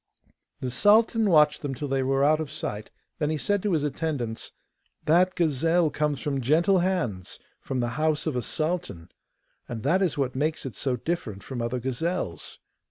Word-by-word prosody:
The 125 - -2
sultan 220 - +4
watched 150 -4 +4
them 140 -2 -3
till 145 - -4
they 135 0 0
were 135 +1 +1
out 155 +2 +4
of 155 -3 -3
sight: 105 -4 -5 0.3
then 150 -2 0
he 155 - 0
said 205 +6 0
to 205 -2 0
his 155 -3 +1
attendants, 140 -6 -3 0.5
'That 180 +4 +4
gazelle 165 +1 +2
comes 150 -2 -1
from 140 -2 -1
gentle 170 +9 +3
hands, 170 - -1 0.2
from 130 -2 -3
the 120 - 0
house 155 -1 +1
of 155 -5 -1
a 125 - 0
sultan, 155 - -3 0.6
and 115 -2 -5
that 170 +7 +2
is 180 -7 +1
what 130 -3 -1
makes 155 +3 -1
it 130 - -5
so 130 +6 -1
different 120 - -4
from 130 -3 -5
other 120 +2 -2
gazelles. 130 - -3
150 Hz, 180 wpm, -26 LUFS, 125-170 Hz, 0.6 s, sultan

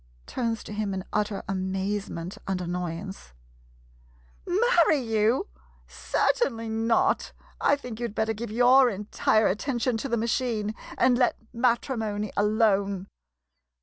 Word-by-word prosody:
[Turns 230 -3 -2
to - - -8
him 205 -2 -2
in 190 - -4
utter 210 -1 -1
amazement 190 -1 -3
and 190 -1 -1
annoyance.] 175 - -5 1.1
Marry 360 -5 +4
you? 225 - +1 0.4
Certainly 230 - 0
not! 225 +1 +1 0.3
I 285 - +4
think 250 -5 -8
you 240 - -1
'd 215 - -12
better 220 0 0
give 225 +2 -6
your 250 +3 +5
entire 210 +1 +1
attention 240 +4 0
to 270 +5 -4
the 235 - +1
ma 225 - -1
chine 225 -3 -1 0.2
and 250 -1 +3
let 245 - +2 0.2
matrimony 230 -4 0
alone. 200 -2 +1
220 Hz, 125 wpm, -26 LUFS, 200-245 Hz, 1.1 s, your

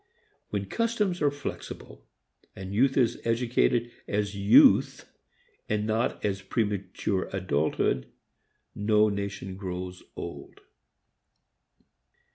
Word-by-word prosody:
When 100 -1 -2
customs 210 - -1
are 145 - +4
flexible 145 -1 -8 0.5
and 95 0 -7
youth 130 +5 +3
is 125 -4 +2
educated 120 0 +1 0.2
as 105 0 -1
youth 100 +2 +5 0.6
and 105 0 0
not 110 +1 -1
as 100 -1 -1
premature 100 -2 -2
adulthood, 75 -8 0 0.7
no 105 +1 +3
nation 100 -2 -4
grows 90 -1 -5
old. - - -8
105 Hz, 90 wpm, -27 LUFS, 95-120 Hz, 0.7 s, youth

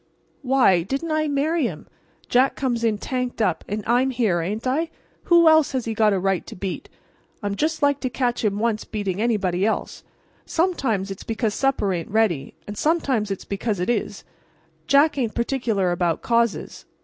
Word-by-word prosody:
"Why, 255 - +4
didn't 275 - -3
I 310 0 +1
marry 295 +1 +1
him? 160 -8 -8 0.4
Jack 255 +2 +3
comes 240 -4 -1
in 220 -2 +2
tanked 250 +2 -3
up; 185 -7 +1
and 210 +1 -3
I'm 245 +3 +2
here, 225 -9 +1
ain't 210 +8 -4
I? 305 +6 0 0.4
Who 340 -1 +6
else 315 -3 +5
has 255 -3 -1
he 225 - -2
got 215 -1 +3
a 195 - +1
right 190 -1 0
to - - -8
beat? 185 0 -5 0.5
I'd 200 -1 -1
just 310 +5 -1
like 285 -1 +3
to 260 -1 -2
catch 245 -1 -1
him 205 -2 +1
once 220 -1 0
beating 205 -2 -3
anybody 195 -6 0
else! 220 - -2 0.4
Sometimes 265 - 0
it's 195 - -7
because 225 -1 -1
supper 260 -8 +1
ain't 170 -2 -4
ready; 210 -9 0
and 205 - -7
sometimes 270 -8 0
it's 195 - -4
because 200 0 -2
it 180 +6 +1
is. - - -3 0.6
Jack 285 +1 +4
ain't 230 -4 -1
particular 235 -7 0
about 175 -2 0
causes. 235 -2 0
230 Hz, 180 wpm, -23 LUFS, 200-270 Hz, 0.6 s, Who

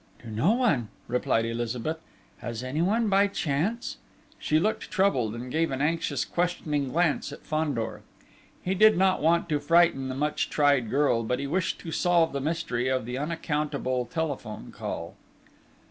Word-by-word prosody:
"To 115 - -8
no 140 - +3
one," 220 - +2 0.2
replied 120 -2 +1
Elizabeth. 120 +6 -2 0.4
"Has 120 0 -5
anyone 175 - +1
by 200 0 +4
chance?..." 195 - -2 0.4
She 155 - +2
looked 215 +6 0
troubled, 135 - +1
and 125 +2 -6
gave 165 +3 +1
an 135 - -3
anxious 155 -2 0
questioning 155 -5 -1
glance 165 -2 +1
at 145 - -10
Fandor. 150 -7 -2 0.6
He 185 - 0
did 215 +2 +6
not 190 0 +3
want 170 +3 +3
to 150 -2 +1
frighten 155 -3 +3
the 130 - -3
much 150 +2 -1
tried 140 -6 +3
girl, 135 -3 +2
but 120 +2 -1
he 140 - -3
wished 170 +5 -1
to 165 - -6
solve 170 -2 +2
the 140 - -2
mystery 145 -5 -1
of 130 -3 0
the 125 +2 -4
unaccountable 150 -5 -1
telephone 135 - -4
call. - - -5
150 Hz, 160 wpm, -27 LUFS, 130-170 Hz, 0.6 s, did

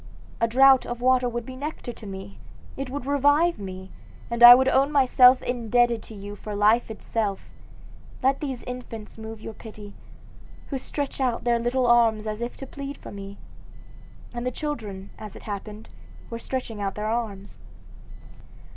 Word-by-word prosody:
A 230 - +2
draught 265 +2 +6
Of 240 0 -4
water 255 0 +3
would 240 0 -4
be 260 - -8
nectar 280 -3 -6
to 220 - -12
me; 195 0 -9 0.4
it 270 -1 -5
would 270 -1 -5
revive 290 +4 +3
me, 190 -1 -8 0.4
and 235 0 -3
I 240 0 +13
would 260 +1 +2
own 270 +2 +3
myself 255 -2 +6
indebted 240 -1 +1
to 220 - -12
you 205 +1 -8
for 210 +1 -7
life 215 +4 +3
itself. 215 -2 -3 0.7
Let 270 +1 +2
these 265 -5 -4
infants 230 -4 -8
move 220 0 -8
your 225 - -7
pity, 210 -2 -11 0.8
who 270 - -2
stretch 280 +1 -4
out 245 -3 0
their 235 -1 +2
little 245 +2 0
arms 230 -3 +4
as 215 +1 -4
if 240 +1 -4
to 270 - -7
plead 280 +1 -7
for - - -11
me;' 200 0 -9 1.0
and 240 0 -4
the 250 - 0
children, 220 -9 -6
as 215 -2 -9
it - - -11
happened, 210 +1 -7 0.4
were 230 - -4
stretching 235 -4 -5
out 195 -1 -2
their 210 - -4
arms. 215 -3 -4
235 Hz, 170 wpm, -25 LUFS, 210-260 Hz, 1.0 s, I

